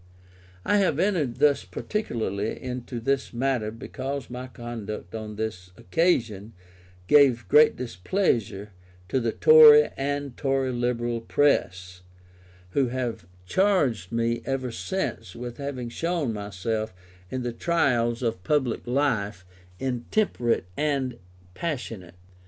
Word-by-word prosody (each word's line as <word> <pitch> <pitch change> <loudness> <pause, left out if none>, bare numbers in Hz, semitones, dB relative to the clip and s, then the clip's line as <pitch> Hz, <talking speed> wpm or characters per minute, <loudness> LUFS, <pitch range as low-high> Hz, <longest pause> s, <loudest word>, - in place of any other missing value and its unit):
I 205 - +3
have 190 -8 +2
entered 170 - +1
thus 145 -2 +3
particularly 105 - -3
into 125 -1 -5
this 135 +3 -1
matter 120 -3 0
because 130 +3 -6
my 125 +1 -6
conduct 115 -7 -7
on 110 -1 -6
this 105 -4 -4
occasion 115 - 0 0.5
gave 135 0 +5
great 150 +1 +6
displeasure 115 - -1 0.4
to 130 - +1
the 115 -2 0
Tory 460 - +8
and 140 -1 -3
Tory 135 -2 0
Liberal 120 -1 -1
press, 90 -10 0 0.7
who 135 +3 +2
have 120 -6 -4 0.2
charged 140 - +1
me 115 0 0
ever 130 -1 -2
since 115 - -4
with 120 0 -7
having 135 -4 -4
shown 165 -2 -1
myself, 105 +1 -3 0.3
in 130 +3 -3
the 120 -1 -3
trials 120 -5 +1
of 110 -6 -2
public 130 0 0
life, 110 -9 0 0.3
intemperate 125 - 0
and 140 -4 -1 0.3
passionate. 115 - -5
120 Hz, 115 wpm, -26 LUFS, 110-140 Hz, 0.7 s, Tory